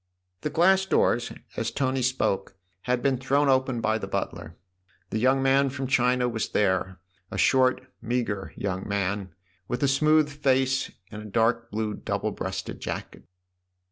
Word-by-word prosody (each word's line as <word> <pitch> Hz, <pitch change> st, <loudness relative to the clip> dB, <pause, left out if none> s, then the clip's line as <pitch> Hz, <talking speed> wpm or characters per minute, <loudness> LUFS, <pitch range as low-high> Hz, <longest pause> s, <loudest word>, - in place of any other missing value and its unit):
The 150 Hz, -, -2 dB
glass 190 Hz, +5 st, +3 dB
doors, 120 Hz, -8 st, +2 dB, 0.2 s
as 115 Hz, -, -1 dB
Tony 130 Hz, +2 st, -1 dB
spoke, 125 Hz, -6 st, 0 dB, 0.3 s
had 125 Hz, 0 st, 0 dB
been 135 Hz, -3 st, +2 dB
thrown 140 Hz, +2 st, +2 dB
open 130 Hz, -2 st, +2 dB
by 110 Hz, 0 st, +1 dB
the -, -, -5 dB
butler. 80 Hz, +1 st, -4 dB, 0.5 s
The 110 Hz, -, -1 dB
young 130 Hz, +3 st, +3 dB
man 135 Hz, +1 st, +4 dB
from 135 Hz, 0 st, -4 dB
China 125 Hz, -1 st, +2 dB
was 115 Hz, -2 st, -2 dB
there 95 Hz, -2 st, 0 dB, 0.3 s
a -, -, -6 dB
short, 130 Hz, -1 st, +3 dB, 0.2 s
meagre 115 Hz, -4 st, -2 dB
young 95 Hz, -1 st, -3 dB
man, 100 Hz, -1 st, -2 dB, 0.3 s
with 125 Hz, +3 st, -2 dB
a -, -, +4 dB
smooth 155 Hz, +3 st, +4 dB
face 135 Hz, -2 st, +1 dB, 0.2 s
and 105 Hz, -, -7 dB
a -, -, -10 dB
dark 115 Hz, +3 st, +1 dB
blue 110 Hz, 0 st, -2 dB
double -, -, -2 dB
breasted -, -, -5 dB
jacket. -, -, -6 dB
125 Hz, 155 wpm, -26 LUFS, 110-135 Hz, 0.5 s, man